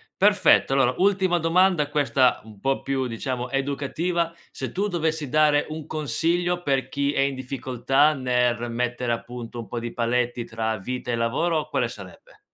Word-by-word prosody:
Perfetto, 200 -8 +4
allora 130 -2 +3
ultima 190 -2 +2
domanda, 170 -2 +3
questa 140 -4 +2
un 110 -2 -14
po' 135 +5 0
più 135 -1 -1
diciamo 125 +1 -4
educativa: 145 +5 -1 0.2
se - - -5
tu 200 +3 -1
dovessi 160 -5 -1
dare 150 0 +3
un 155 -1 -6
consiglio 165 +5 0
per 135 -5 0
chi 140 0 0
è 135 - +1
in 140 0 +1
difficoltà 130 +2 +1
nel 125 -3 0
mettere 120 0 -1
appunto 120 0 -6
un 115 - -7
po' 120 - -4
di 120 0 -5
paletti 120 0 0
tra 110 -1 -3
vita 125 +5 -4
e - - +1
lavoro 150 +8 0
quale 120 - 0
sarebbe? 100 -6 -12
135 Hz, 165 wpm, -24 LUFS, 120-155 Hz, 0.2 s, Perfetto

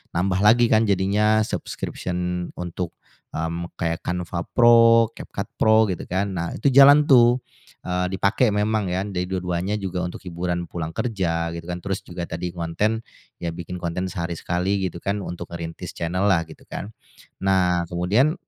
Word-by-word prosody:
nambah 95 +2 +1
lagi 115 +3 +6
kan 110 0 +4
jadinya 105 +3 +3
subscription 90 0 -4
untuk, 90 0 -5 0.4
mmm, 85 +2 -3
kayak 85 -1 -2
Canva 90 0 -3 0.2
Pro, 115 -1 +6
CapCut - - -6
Pro 110 0 +5
gitu 90 -4 -4
kan. 95 +2 -1
Nah 85 -2 -2
itu 135 +5 +1
jalan 140 +2 +8
tuh, 125 -2 +5 0.4
eee, 90 0 -1
dipakai 110 +5 +2
memang 105 -1 0
ya 95 +2 -1
jadi 90 -3 -3
dua-duanya 90 +1 -2
juga 95 -3 -3
untuk 90 0 -5
hiburan 85 0 -3
pulang 80 -2 -6
kerja 85 -8 -1
gitu 85 +1 -7
kan. 90 - -3
Terus 100 -1 -2
juga 85 0 -6
tadi 85 +1 -4
ngonten 105 +7 -1 0.3
ya 85 -1 -4
bikin 90 +1 -6
konten 90 +2 -3
sehari 85 -2 -3
sekali 90 +4 -1
gitu 90 -2 -3
kan 100 +4 -2
untuk 85 -2 -7
ngerintis 85 -1 -6
channel-lah 90 +2 +1
gitu 80 - -14
kan. 100 - -6 0.6
Nah 90 -2 +2
kemudian 90 - +2
90 Hz, 160 wpm, -23 LUFS, 85-105 Hz, 0.6 s, jalan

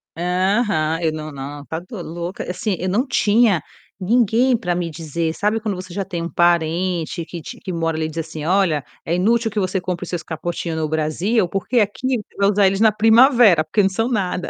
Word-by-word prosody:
Aham, 180 -2 0
eu 160 - +1
não 155 0 -6
não 140 +1 -7
está 160 +2 -5
doi 185 +2 -9
louca, 170 +3 -6
assim, 190 +2 -2
eu 185 - -2
não 220 +8 +1
tinha 215 -6 +3 0.4
ninguém 235 +5 +3
para 180 -5 -2
me 175 -1 -2
dizer. 160 +1 -3
Sabe 210 +5 0
quando 215 -2 -3
você 185 -1 -8
já 195 +1 -2
tem 175 -3 -4
um 170 - -4
parente 170 0 +1
que 170 0 -8
te 240 +9 -9
que 185 - -6
uma 165 -1 -2
hora 160 -1 -1
ali 160 - -1
e - - -3
diz 165 0 -5
assim: 155 -1 -7
"Olha, 175 -5 +2 0.2
é 170 - 0
inútil 225 +5 +2
que 210 - -1
você 190 0 0
compre 180 0 -4
os - - -7
seus 175 -2 -3
capotinho 165 +1 -4
no 160 -1 -1
Brasil, 170 +7 0
porque 195 +7 0
aqui 245 +5 0
você 210 - -11
vai 200 0 +3
usar 200 -1 +4
eles 195 +1 0
na 220 -1 +6
primavera, 225 - +5
porque 155 +7 +1
eles 195 -1 +2
não - - -9
são 245 - -2
nada". 185 -5 -1
180 Hz, 230 wpm, -20 LUFS, 165-210 Hz, 0.4 s, na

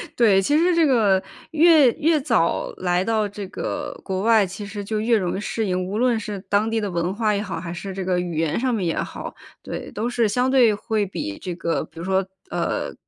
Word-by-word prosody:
对， 205 -5 +4
其 290 +10 +2
实 350 +2 +3
这 335 -1 +4
个 215 -9 +3 0.3
越 315 -5 +6
越 315 +1 +2
早 230 - +1
来 180 0 +1
到 220 0 +1
这 200 -1 -7
个 - - -5
国 190 0 -3
外， 220 -1 +4
其 190 +3 -7
实 205 0 -6
就 215 +1 -2
越 225 +1 +3
容 185 -4 -1
易 - - -3
适 220 +1 -2
应， 185 -1 -1
无 200 +3 -3
论 240 -1 +2
是 205 -2 -5
当 205 +2 +2
地 225 0 0
的 205 -2 -2
文 175 +1 -1
化 215 0 +1
也 200 - -1
好， 195 -5 -4
还 170 0 -6
是 190 +3 -6
这 190 0 -4
个 180 -1 +1
语 175 -3 -3
言 160 +2 0
上 255 0 0
面 205 -5 -1
也 165 - 0
好， - - -6 0.3
对， - - -6
都 220 +3 -3
是 240 -2 +1
相 250 +4 +1
对 245 -5 +5
会 215 0 -1
比 100 - -5
这 180 -2 -5
个， 170 -1 -1
比 165 - -14
如 - - -5
说， 190 0 +1 0.3
呃， - - -2
205 Hz, 250 characters per minute, -22 LUFS, 185-230 Hz, 0.3 s, 越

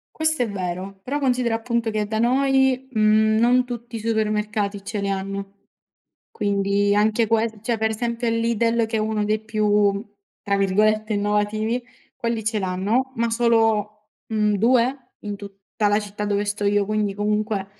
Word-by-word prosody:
Questo 315 -4 +1
è 225 - -3
vero, 190 0 -5
però 285 +3 -2
considera 250 -4 +1
appunto 230 0 -1
che 215 -1 -1
da 220 +1 -2
noi, 265 +1 +2
mhmm, 215 -1 +3
non 245 +2 +4
tutti 240 -1 -7
i - - -3
supermercati 210 -2 -1
ce 205 +1 -4
le 200 0 -2
hanno. 195 0 -4 0.8
Quindi 200 0 +1
anche 215 +2 +2
ques 220 -1 0
cioè 230 -1 -1
per 220 0 +1
esempio 235 +1 -2
il 230 0 +1
Lidl 230 0 +1
che 220 - -2
è - - +1
1 215 -1 -1
dei 215 +1 +1
più 210 -1 +1 0.4
tra 200 0 0
virgolette 215 +3 +2
"innovativi", 210 +3 0 0.3
quelli 230 -2 -3
ce 220 0 0
l'hanno, 205 +8 -1
ma 230 0 0
solo, 225 -2 +1 0.2
mhmm, 215 -1 +1
2 250 +3 +1
in 205 -1 -5
tutta 200 +1 -4
la 205 +1 +3
città 210 0 -5
dove 205 0 0
sto 205 0 -3
io, 205 0 +2
quindi 210 -1 -1
comunque 210 -1 -1
215 Hz, 165 wpm, -22 LUFS, 205-230 Hz, 0.8 s, non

